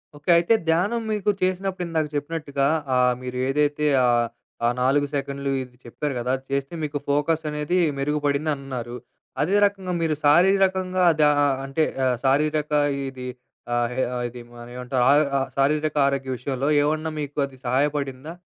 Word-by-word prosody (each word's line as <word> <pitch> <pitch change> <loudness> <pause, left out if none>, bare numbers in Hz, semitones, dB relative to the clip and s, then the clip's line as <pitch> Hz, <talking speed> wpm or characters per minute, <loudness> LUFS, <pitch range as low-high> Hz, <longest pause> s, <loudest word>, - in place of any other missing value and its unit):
Okay. 145 +3 -8
అయితే 175 +7 +2
ధ్యానం 190 +9 +1
మీకు 210 -1 0
చేసినప్పుడు 185 0 -1
ఇందాక 160 -2 -1
చెప్పినట్టుగా 145 -2 -1 0.3
ఆహ్, 125 0 +4
మీరు 125 0 -5
ఏదైతే 150 +2 +1 0.2
ఆహ్, 120 -1 +3 0.4
ఆ - - +4
4 140 +3 +2
సెకన్‌లు 140 -1 -2
ఇది 125 -1 -15
చెప్పారు 145 +4 -4
కదా! 125 +1 -1
అది 130 - -18
చేస్తే 140 +3 -2
మీకు 145 -1 -2
ఫోకస్ 150 +3 +1
అనేది 150 +4 -1 0.2
మెరుగుపడింది 145 +1 0
అన్నారు, 130 -3 -6 0.5
అదే 180 +7 +1
రకంగా 195 -3 -2
మీరు 160 -2 +1
శారీరకంగా 185 +3 +3 0.2
ద - - +4 0.2
అ - - +4 0.2
అంటే 135 +4 0 0.2
ఆహ్, 125 -1 +2
శారీరక 150 +2 +1 0.4
ఇది, 130 -1 -8 0.5
ఆహ్, 120 0 0
హె 130 - +1 0.3
ఇది 120 0 -10
మన 120 0 -10
ఏమంటారు 125 0 -1
అ - - +7 0.3
అ - - 0 0.2
శారీరక 150 +2 +1
ఆరోగ్య 135 -1 -2
విషయంలో 135 +2 -2
ఏమన్నా 155 +2 0
మీకు 145 0 -7
అది 135 -1 -16
సహాయపడిందా? 140 +2 -1
145 Hz, 155 wpm, -23 LUFS, 135-160 Hz, 0.5 s, అ